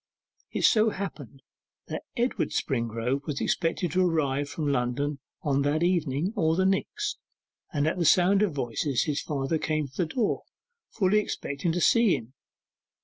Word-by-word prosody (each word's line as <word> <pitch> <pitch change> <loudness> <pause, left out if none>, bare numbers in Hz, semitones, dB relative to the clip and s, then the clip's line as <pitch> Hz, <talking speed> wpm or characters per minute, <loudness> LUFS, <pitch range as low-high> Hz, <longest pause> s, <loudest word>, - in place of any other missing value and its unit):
It - - -3
so 220 -1 +5
happened 150 - -7 0.4
that - - -5 0.2
Edward 240 +2 0
Springrove 120 +1 -1
was 145 -3 -2
expected 165 0 0
to 185 +3 +3
arrive 145 -5 0
from 150 0 -3
London 140 +2 0 0.2
either 150 - -1
on 140 - +2
that 145 +3 +1
evening 170 0 +1
or 160 -5 +2
the 190 +2 +2
next, 415 - -1 0.5
and 145 -4 0
at 165 +4 0
the 170 - +1
sound 185 +5 +5
of 210 -4 +2
voices 130 -1 -1
his 150 -2 -1
father 145 +2 -1
came 155 -2 -1
to 135 - -22
the 175 - +1
door 220 +5 0 0.5
fully 205 0 +2
expecting 155 -5 -2
to 175 - -1
see 230 -1 +5
him. 115 +3 -8
155 Hz, 165 wpm, -27 LUFS, 140-185 Hz, 0.5 s, so